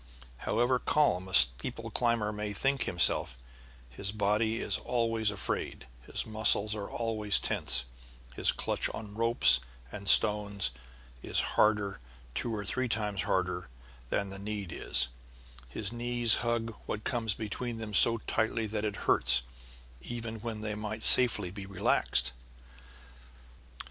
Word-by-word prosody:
However 125 +2 +1
calm 95 -14 +1
a 95 - -11
steeple - - +3
climber 115 -3 +1
may 105 0 -5
think 135 +6 -1
himself, 85 -7 +1 0.5
his 95 +11 -5
body 105 +2 0
is - - -1
always 115 -3 0
afraid, 105 -9 -4 0.2
his - - -3
muscles 110 -1 +3
are 105 -2 -6
always 110 -3 +1
tense, 65 0 +1 0.5
his - - +4
clutch - - -1
on 105 -2 -9
ropes 115 - +4 0.3
and 100 -1 -8
stones 105 - +5 0.5
is - - -10
always - - -1
harder, 105 - +1 0.3
two 115 - -3
or 105 -1 -5
three 130 +4 -2
times 105 -3 -1
harder, 90 -4 -2 0.4
than 100 +7 -1
the 95 0 -7
need 100 -3 -5
is; 65 - 0 0.6
his 105 - -4
knees 120 -1 +1
hug 115 -1 -2
what 105 - -4
comes 115 -4 -1
between 115 +2 -5
them 110 -2 -7
so 115 +3 +6
tightly 110 +1 -2
that 105 0 -4
it 105 -1 -2
hurts, 65 0 +3 0.6
even 115 - -6
when 110 -1 -5
they 105 -1 -4
might 105 +1 -6
safely 120 -8 +5
be 100 0 -9
relaxed. 90 -8 +1
105 Hz, 140 wpm, -30 LUFS, 100-115 Hz, 0.6 s, so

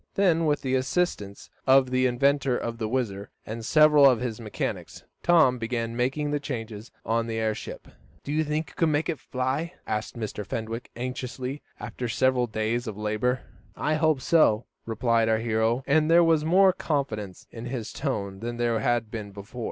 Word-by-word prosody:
Then, 170 -5 +3
with 150 -1 +1
the 130 -1 -1
assistance 130 - -1 0.2
of 130 -1 +5
the 130 0 +3
inventor 135 +1 +2
of 115 0 -4
the 110 - -1
WHIZZER, 105 -5 -2 0.2
and 115 +1 -6
several 150 +1 +6
of 125 -4 +2
his 120 -3 -3
mechanics, 105 -2 -5 0.2
Tom 155 -8 +4
began 115 0 -2
making 135 +5 0
the 145 - 0
changes 115 -5 -6 0.2
on 115 +1 0
the 115 -1 -3
airship. 110 -1 -3 0.4
"Do 140 - -5
you 155 +1 +2
think 150 +1 -2
you - - -17
can 165 -2 +1
make 150 +3 0
it 160 - -2
fly?" 135 +7 -2
asked 110 +3 -3
Mr. 110 -2 -4
Fenwick, 115 +3 -5
anxiously, 125 +2 -5 0.2
after 125 -2 -5
several 125 +1 +2
days 110 +3 -2
of 105 -2 -5
labor. 110 +4 0 0.3
"I 150 - 0
hope 155 -3 +2
so," 125 -8 +3 0.2
replied 115 0 +1
our 110 - +3
hero, 115 +2 0
and 155 +2 +3
there 170 +1 +7
was 165 -2 +3
more 185 +4 +5
confidence 110 - -3
in 115 0 -8
his 120 -3 -5
tone 100 -9 -3
than 120 +2 -4
there 120 -1 +1
had 115 -1 0
been 110 -3 -5
before. 100 +5 -10
125 Hz, 180 wpm, -26 LUFS, 110-145 Hz, 0.4 s, there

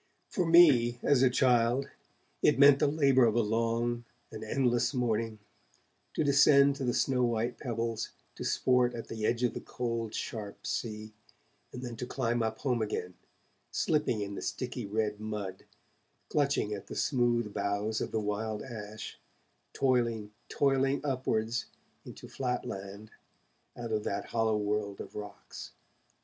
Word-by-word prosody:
For 180 -3 0
me, 140 -9 +6
as 140 -3 +4
a 130 - +6
child, 125 0 +3 0.5
it - - +4
meant 140 0 +7
the - - +3
labour 140 -4 +4
of 110 -1 +2
a 120 - +4
long, 115 +2 0 0.3
an 110 - -7
endless 120 +1 +1
morning, 115 -2 0 0.8
to - - +1
descend 140 0 +5
to 140 - -4
the 120 -1 +1
snow 130 -2 +2
white 120 0 -1
pebbles, 115 -2 -3 0.2
to - - -7
sport 125 -1 +2
at 115 - -7
the 110 -1 -2
edge 120 +1 0
of 125 - +2
the - - -4
cold, 115 -2 -3
sharp 105 -3 -6
sea, 110 -1 -4 0.6
and 125 - -7
then 120 -2 -5
to 125 - -5
climb 120 -3 -1
up 110 -1 -1
home 125 -4 0
again, 90 -4 -3 0.6
slipping 150 -8 0
in 100 0 -4
the - - -5
sticky 125 -3 -4
red 105 0 -1
mud, 105 -3 -5 0.6
clutching 140 -7 +1
at 100 - -7
the - - -7
smooth 120 -5 +1
boughs 100 +2 -1
of - - -2
the 110 - 0
wild 105 +1 -3
ash, 110 -3 -8 0.5
toiling, 115 -5 +1 0.2
toiling 135 0 +2
upwards 115 -4 -1 0.4
into - - -10
flat 125 -2 -2
land 100 +2 -7 0.7
out 115 -1 -5
of 105 -1 0
that 100 0 -2
hollow 110 -2 +2
world 105 -1 -2
of - - -8
rocks. 105 -1 -9
115 Hz, 155 wpm, -30 LUFS, 110-125 Hz, 0.8 s, meant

